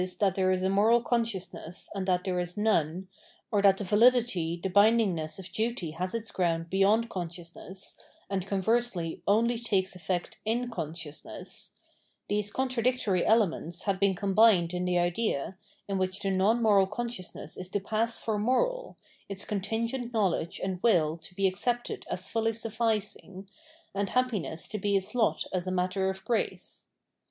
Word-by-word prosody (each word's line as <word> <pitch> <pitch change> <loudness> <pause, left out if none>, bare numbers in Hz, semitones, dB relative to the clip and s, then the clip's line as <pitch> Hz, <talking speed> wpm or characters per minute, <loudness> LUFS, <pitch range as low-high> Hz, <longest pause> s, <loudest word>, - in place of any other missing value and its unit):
that 195 -3 +3
there 190 -1 +1
is 185 0 +1
a 190 - +2
moral 215 +4 +5
consciousness 225 -8 -2
and 195 -2 -3
that 180 -1 +2
there 185 -2 -1
is 175 +1 -4
none, 190 -4 +1 0.4
or 205 -2 +3
that 195 -1 +5
the 205 - -3
validity, 210 -5 +3
the - - +1
bindingness, 200 -5 +3
of 190 -2 -9
duty 220 -7 -1
has 185 +6 -3
its 225 -1 -3
ground 165 -2 -1
beyond 205 +4 +3
consciousness, 175 0 -6 0.3
and 195 -1 -2
conversely 195 -3 0
only 230 +3 +3
takes 195 -5 0
effect 180 0 -3
in 240 +3 -1
consciousness 160 -5 -5 0.3
— - - -42
these 205 0 +1
contradictory 250 -6 +1
elements 180 -5 +1
had 195 -2 0
been 200 -1 +3
combined 195 -2 +4
in 180 0 -1
the 180 0 +1
idea, 175 -1 0 0.3
in 195 -1 -1
which 185 +2 -1
the 195 - 0
non 205 +5 +2
moral 200 -3 +5
consciousness 210 -7 -4
is 185 0 -5
to 205 - -1
pass 225 +3 -1
for 215 -2 -2
moral, - - 0 0.3
its 195 0 -3
contingent 230 +5 -2
know 215 -5 +3
ledge 170 +2 -3
and 185 -1 -2
will 165 -9 +3
to 170 +2 -10
be 195 0 +1
accepted 240 +6 -2
as 185 - -3
fully 225 0 0
sufficing, 215 -4 -2 0.5
and 200 0 -1
happiness 225 -10 -1
to 215 - -4
be 200 0 +2
its 190 +4 -2
lot 235 -3 +1
as 185 0 -1
a - - 0
matter 185 +1 0
of 190 0 -6
grace. 235 - -2
195 Hz, 165 wpm, -29 LUFS, 180-225 Hz, 0.5 s, moral